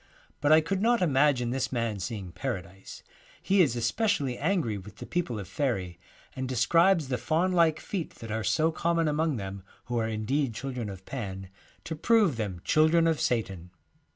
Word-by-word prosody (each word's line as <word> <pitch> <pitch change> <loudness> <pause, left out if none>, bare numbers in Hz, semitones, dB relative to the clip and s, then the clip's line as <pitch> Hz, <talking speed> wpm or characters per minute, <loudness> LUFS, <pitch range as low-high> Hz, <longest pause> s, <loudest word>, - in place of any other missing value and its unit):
But 145 - +2
I 155 +1 +7
could 185 +5 -2
not 235 -2 +3
imagine 135 -5 +2
this 130 0 -1
man 115 -5 -1
seeing 95 -1 -5
Paradise. 95 -5 -6 0.4
He 195 0 +3
is 135 -8 +3
especially 135 - 0
angry 155 - 0
with 100 +2 -12
the - - -9
people 170 -10 -2
of 100 - -7
faery, 95 - -2 0.4
and 130 -1 -4
describes 160 +6 +3
the 125 -2 -1
faun 160 +9 +1
like 165 -3 +3
feet 185 -6 -5
that 115 -1 -8
are 110 0 -2
so 160 - +2
common 165 0 0
among 155 0 +1
them, 100 -2 -6 0.2
who 120 -1 -1
are 110 - 0
indeed 115 +4 -1
children 125 -4 -4
of 95 -1 -9
Pan, 95 -7 -6 0.3
to 160 - -5
prove 205 - +3
them 100 -6 -4
children 160 +2 +4
of 165 -2 +1
Satan. 95 -7 -1
130 Hz, 180 wpm, -28 LUFS, 110-160 Hz, 0.4 s, I